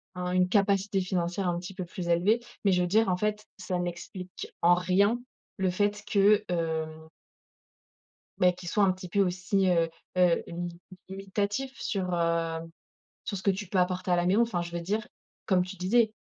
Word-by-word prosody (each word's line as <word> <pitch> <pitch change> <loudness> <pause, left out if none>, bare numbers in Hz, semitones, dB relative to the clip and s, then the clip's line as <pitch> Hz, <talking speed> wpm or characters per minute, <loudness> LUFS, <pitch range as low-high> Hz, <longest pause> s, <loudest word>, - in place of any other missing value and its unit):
un 180 0 -3
une 180 0 +3
capacité 200 -1 +2
financière 180 0 -1
un 175 -1 0
petit 185 +2 -8
peu 185 -1 -5
plus 175 0 -6
élevée. 180 +7 +3 0.3
Mais 200 - +5
je 180 -1 +3
veux 180 - +1
dire 215 +3 +3
en 180 - +1
fait, 210 +2 -1
ça 180 -2 -3
n'explique 180 +1 -6
en 175 +1 +6
rien 195 +6 +2 0.4
le 190 -2 +1
fait 205 +2 0
que 210 +1 +4
hem 160 -2 -2 1.3
bah 180 0 +5
qu'il 180 0 -9
soit 205 +4 +3
un 190 - +4
petit 185 0 -9
peu 200 +4 +1
aussi, 190 +1 +1
heu, 165 -2 +2 0.3
heu, 180 -2 +4 0.7
limitatif 200 +6 -2
sur, 185 -4 -2
heu, 165 -1 0 0.7
sur 200 - -3
ce 190 - -8
que 200 - +4
tu 195 +1 -5
peux 190 - -2
apporter 180 0 +1
à - - +5
la 175 0 +1
maison. 195 +6 +4
Enfin, 225 -7 0
je 170 0 -6
veux 170 0 -3
dire, 210 +5 -2 0.4
comme 185 -2 +3
tu 185 +2 -8
disais, 215 +5 +2
185 Hz, 190 wpm, -28 LUFS, 175-200 Hz, 1.3 s, en